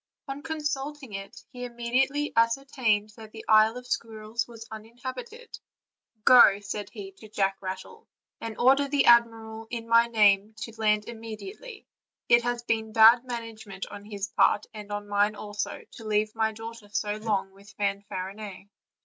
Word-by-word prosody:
On 275 +1 -5
consulting 295 -4 -4
it, 195 0 -8
he 250 -2 -8
immediately 250 +5 0
ascertained 230 -3 +1
that 220 -1 -11
the 220 0 -10
Isle 220 +2 +5
of 250 - -9
Squirrels 225 -1 -3
was 230 -1 -11
uninhabited. 260 - -8 0.7
"Go," 235 -5 +8
said 205 0 -5
he 200 -4 -9
to 215 - -13
Jack 195 -2 0
Rattle, 190 - -7 0.3
"and 225 -1 -6
order 270 +3 +4
the 280 0 +2
admiral 225 -2 +3
in 230 -1 -5
my 230 0 +5
name 210 -2 +3
to 225 +1 -6
land 210 -1 +1
immediately; 235 - -9 0.4
it 235 0 +6
has 240 0 -2
been 220 -2 -1
bad 230 +3 +7
management 225 -5 -6
on 205 - -9
his 205 -1 -5
part, 205 0 +3
and 210 -1 -9
on 205 0 -4
mine 205 +1 +2
also, 205 0 -5
to 230 - -11
leave 215 0 0
my 220 -1 +1
daughter 225 -1 -9
so 210 0 -2
long 210 -3 -1
with 200 +1 -17
Fanfarinet." 200 0 -4
220 Hz, 155 wpm, -27 LUFS, 205-240 Hz, 0.7 s, Go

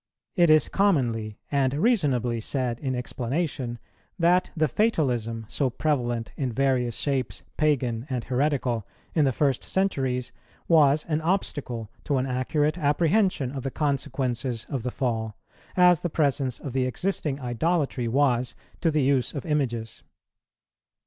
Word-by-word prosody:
It 175 -4 +4
is 155 -2 +5
commonly, 120 - +1
and 140 -2 +2
reasonably, 140 - +1
said 125 -1 -2
in 130 -2 -2
explanation, 125 0 -3 0.4
that 180 +1 +3
the 155 0 +3
fatalism, 120 - 0
so 135 +3 0
prevalent 120 -4 -1
in 130 -3 -2
various 125 -2 +1
shapes 135 -4 -1
pagan 130 -5 0
and 125 -3 -2
heretical, 125 -4 0 0.3
in 155 -3 +3
the 135 - +3
first 135 0 +1
centuries, 135 -10 -1 0.4
was 150 -3 +5
an 155 -1 -1
obstacle 145 - -2
to 140 - +1
an 130 - 0
accurate 145 +6 0
apprehension 165 - +2
of 135 -1 -5
the 135 - -2
consequences 130 -4 -2
of 135 -4 -1
the 125 - -2
fall, 110 -4 -2 0.4
as 180 -2 +6
the 175 - -2
presence 140 -5 0
of 135 - -6
the 130 -1 +1
existing 150 -1 -2
idolatry 130 +1 0
was 125 -1 +1 0.2
to 165 - +2
the 150 -2 +1
use 130 -1 +1
of 140 - -4
images. 120 -7 -2
135 Hz, 140 wpm, -26 LUFS, 120-155 Hz, 0.4 s, as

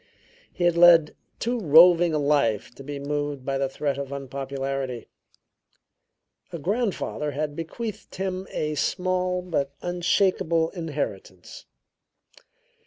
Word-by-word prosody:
He 175 - 0
led 170 -2 +6 0.2
too 240 +1 -1
roving 170 0 +6
a 155 - 0
life 140 -8 +1
to 135 - -12
be 145 +1 -6
moved 145 -1 -3
by 135 0 -1
the 135 -1 0
threat 140 0 -2
of 140 -1 -5
unpopularity; 135 -2 -4 1.4
a - - -5
grandfather 195 - -2
had 150 +1 -3
bequeathed 205 +7 -6
him 190 0 -3
a 150 0 -2
small 180 +3 -1
but 140 -6 -2
unshakable 175 -2 +1
inheritance. 170 - -6
155 Hz, 110 wpm, -25 LUFS, 140-180 Hz, 1.4 s, led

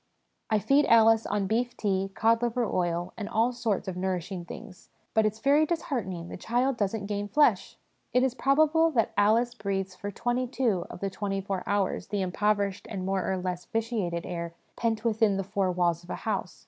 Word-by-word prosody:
' - - -49
I 215 - +3
feed 275 +7 +3
Alice 225 -1 +5
on 205 -1 0
beef 240 +4 -1
tea, 195 -2 0
cod 230 +1 +3
liver 240 0 0
oil, 175 -2 -1
and 205 - -4
all 230 +3 +2
sorts 220 -6 -1
of 185 - -3
nourishing 180 -1 -3
things; 180 - -11 0.2
but 220 -1 +4
it's 215 +1 -3
very 280 +6 +4
disheartening, 235 - -2
the - - -7
child 245 +7 0
doesn't 205 -1 -1
gain 205 0 -3
flesh! 295 +9 +2 0.2
' - - -45
It 250 - +3
is 265 -2 +1
probable 310 +5 +3
that 230 -4 +2
Alice 225 +4 +3
breathes 195 -2 -3
for 205 +2 -6
twenty 245 +4 -1
two 235 -8 0
of - - -9
the 195 -1 -2
twenty 195 0 -2
four 195 -1 -3
hours 200 -3 0
the 205 -2 -1
impoverished 200 +1 0
and 190 -3 -4
more 190 0 0
or 190 - 0
less 180 -1 -4
vitiated 215 -7 -2
air 170 -1 -5 0.2
pent 225 -1 -1
within 220 -3 +2
the 195 - -1
four 190 -1 0
walls 175 -1 0
of 175 - -17
a - - -2
house. 200 -4 -2
205 Hz, 200 wpm, -28 LUFS, 190-235 Hz, 0.2 s, Alice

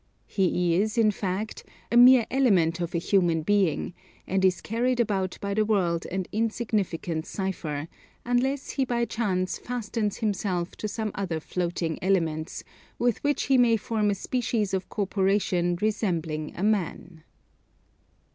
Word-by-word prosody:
He 180 -3 +1
is, 215 +4 0
in 220 -2 +5
fact, 200 +2 -4 0.3
a - - +1
mere 245 -1 +8
element 185 -11 +3
of 170 0 -3
a - - +3
human 170 -2 +2
being, 190 -3 +1 0.3
and 190 +1 0
is 185 -1 +3
carried 245 +3 -1
about 195 -5 0
the 200 +2 0
world 180 -6 0
an 185 +1 -3
insignificant 210 -7 -1
cipher, 160 -6 -3 0.4
unless 255 +3 0
he 270 - 0
by 240 -2 0
chance 190 -6 -1
fastens 225 -3 -3
himself 190 -5 -2
to 215 - -3
some 215 0 -3
other 180 -5 -2
floating 170 -1 -3
elements, 165 -5 0 0.3
with 240 -2 0
which 290 0 +1
he 270 -2 +3
may 230 -2 +5
form 215 0 0
a 200 - +1
species 225 -2 -1
of 190 -1 -2
corporation 190 -3 +1
resembling 170 -8 -1
a 180 - -4
man." 180 -5 -1
200 Hz, 140 wpm, -26 LUFS, 175-225 Hz, 0.4 s, mere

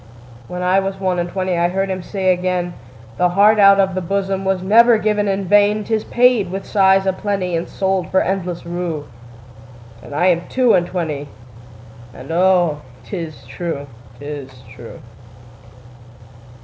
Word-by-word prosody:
When 180 0 -5
I 185 +2 +3
was 195 0 -4
one 185 -2 -1
and 175 0 -2
twentyI 180 -2 -1
heard 195 +2 -2
him 185 -1 -3
say 185 0 0
again,'The 175 -8 -3
heart 205 +4 +4
out 200 0 +6
of 190 -1 +2
the 185 - -2
bosomWas 190 0 -2
never 230 +4 +5
given 210 -1 0
in 195 0 -1
vain;'Tis 210 +2 +2
paid 245 -5 +2
with 195 +2 -5
sighs 195 -1 +3
a 190 - +1
plentyAnd 185 -4 -2
sold 190 -3 -2
for 190 - +2
endless 180 -3 -3
rue.'And 120 -7 -9
I 175 +4 +1
am 175 -1 +1
two 255 -3 +3
and 175 0 +2
twenty, 150 -5 -4 0.9
And 135 +4 -9
oh, 175 -3 +2 0.2
'tis 165 -6 -7
true, 165 -5 -5 0.3
'tis 140 -3 -9
true. 120 -2 -11
180 Hz, 140 wpm, -18 LUFS, 160-195 Hz, 0.9 s, out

